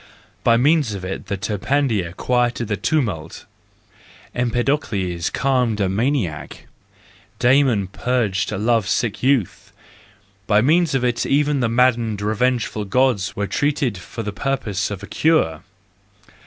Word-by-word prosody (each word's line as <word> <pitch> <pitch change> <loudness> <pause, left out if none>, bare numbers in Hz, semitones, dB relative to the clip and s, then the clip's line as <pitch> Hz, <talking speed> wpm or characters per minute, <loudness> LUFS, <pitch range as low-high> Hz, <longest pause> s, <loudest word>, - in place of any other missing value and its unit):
By 115 -1 +4
means 140 -3 +2
of 95 -2 -6
it 95 +1 -5
Terpander 105 -1 -1
quieted 120 -2 0
a - - +2
tumult, 100 - -2 0.9
Empedocles 115 - -1
calmed 125 -5 0
a 100 - +2
maniac, 105 - -2 0.7
Damon 125 -5 +3
purged 105 -1 -1
a - - -2
love 110 0 +1
sick 120 -5 -1
youth; 130 -7 0 0.8
by 105 -1 +4
means 155 +5 +3
of 125 -2 +1
it 120 -1 0
even 145 0 +2
the 120 -3 +1
maddened, 115 -3 +2
revengeful 110 0 0
Gods 115 -2 +1
were 100 - -1
treated 140 +3 0
for 90 +6 -7
the 105 -1 -4
purpose 105 -4 -2
of 100 -1 -6
a - - -7
cure. 155 - +1
115 Hz, 130 wpm, -21 LUFS, 100-130 Hz, 0.9 s, By